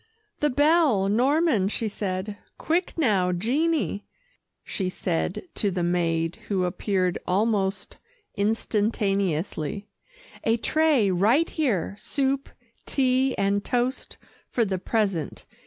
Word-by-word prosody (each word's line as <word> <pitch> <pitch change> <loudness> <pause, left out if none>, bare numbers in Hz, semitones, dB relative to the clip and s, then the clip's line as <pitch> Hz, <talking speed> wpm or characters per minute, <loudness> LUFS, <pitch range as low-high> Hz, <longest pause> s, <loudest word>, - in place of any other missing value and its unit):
"The 295 - +2
bell, 290 - +3
Norman," 255 - +2
she 220 +2 -1
said. 200 0 -3 0.2
"Quick 345 +3 -1
now, 200 - +2
Jeannie," 255 - 0 0.6
she 190 -2 -3
said 180 -1 -2
to 205 - 0
the 180 -2 -2
maid 165 -1 0
who 190 -3 0
appeared 185 0 -1
almost 200 0 0 0.4
instantaneously; 200 -4 -1 0.5
"a 225 +1 +2
tray 290 -6 +2
right 225 - +3
here 215 - -1
soup, 275 -1 -1 0.4
tea 260 -1 +1
and 200 +1 +1
toast, 250 +2 -2 0.3
for 235 - +1
the 190 -2 -2
present. 195 -6 -1
210 Hz, 105 wpm, -25 LUFS, 185-260 Hz, 0.6 s, bell